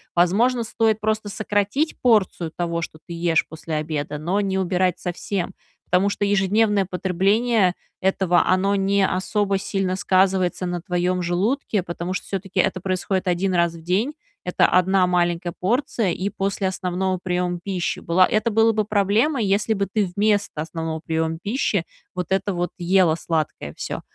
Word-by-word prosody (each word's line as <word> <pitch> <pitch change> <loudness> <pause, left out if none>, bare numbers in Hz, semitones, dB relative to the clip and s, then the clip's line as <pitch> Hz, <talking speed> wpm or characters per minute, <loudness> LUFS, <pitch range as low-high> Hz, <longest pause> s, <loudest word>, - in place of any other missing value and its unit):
возможно, 230 +8 +3
стоит 220 -1 +1
просто 215 -1 -1
сократить 210 +9 -1
порцию 195 -8 +2
того, 170 -1 -2
что 155 - -8
ты 170 - -8
ешь 170 -1 +1
после 160 0 -6
обеда, 150 -1 -3
но 180 +6 0
не 190 -1 0
убирать 180 -1 +1
совсем. 180 +1 -3 0.4
Потому 185 +3 +3
что 205 - -1
ежедневное 205 +1 +2
потребление 190 +3 +1 0.3
этого, 190 -2 +2
оно 195 +2 +2
не 195 0 +2
особо 195 +1 0
сильно 190 -1 -1
сказывается 185 -1 +1
на 175 -1 -3
твоём 180 +1 0
желудке, 200 +5 0
потому 170 +1 -5
что - - -4
всё-таки 195 -1 -4
это 185 -1 +1
происходит 190 0 -1
1 185 +2 0
раз 170 -1 +2
в 165 - -11
день. 195 - 0 0.3
Это 180 - +2
1 185 0 +3
маленькая 175 -1 0
порция, 225 -1 0
и 190 +4 -2
после 195 0 -2
основного 185 0 -2
приёма 180 -1 -1
пищи 185 -3 -2
была. 180 +2 +4
Это 215 +2 +1
было 225 +1 +4
бы 215 - +1
проблемой, 215 +5 +1
если 205 +3 +1
бы 200 -1 -1
ты 205 -4 0
вместо 205 -5 +1
основного 160 0 -4
приёма 160 0 -2
пищи 205 -5 0 0.3
вот 180 -1 -3
это 195 +1 +1
вот 175 -1 -2
ела 175 -2 +3
сладкое 155 - -3
всё. - - -4
185 Hz, 160 wpm, -22 LUFS, 175-205 Hz, 0.4 s, была